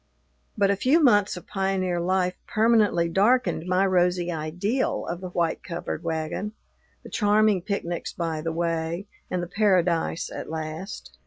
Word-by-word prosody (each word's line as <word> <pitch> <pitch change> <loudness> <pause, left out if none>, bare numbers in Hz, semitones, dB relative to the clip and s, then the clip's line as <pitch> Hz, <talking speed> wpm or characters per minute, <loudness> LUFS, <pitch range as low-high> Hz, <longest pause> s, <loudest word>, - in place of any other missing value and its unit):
But 200 -1 +3
a - - +2
few 265 - +3
months 205 - +4
of 180 - -10
pioneer 190 -2 -1
life 180 +1 +1
permanently 215 -6 +3
darkened 205 0 +2
my 185 +2 +3
rosy 180 -1 +2
ideal 175 - -1
of 170 +1 -5
the 185 - -5
white 170 -2 -1
covered 170 -1 -5
wagon, 165 +6 -3 0.5
the - - -10
charming 210 -2 +3
picnics 175 -3 -3
by 165 -2 -3
the 165 +1 -2
way, 165 +2 -2 0.2
and 180 -1 -1
the - - -4
paradise 180 -4 +1
at - - -6
last. 160 +4 -6
180 Hz, 150 wpm, -25 LUFS, 170-200 Hz, 0.5 s, months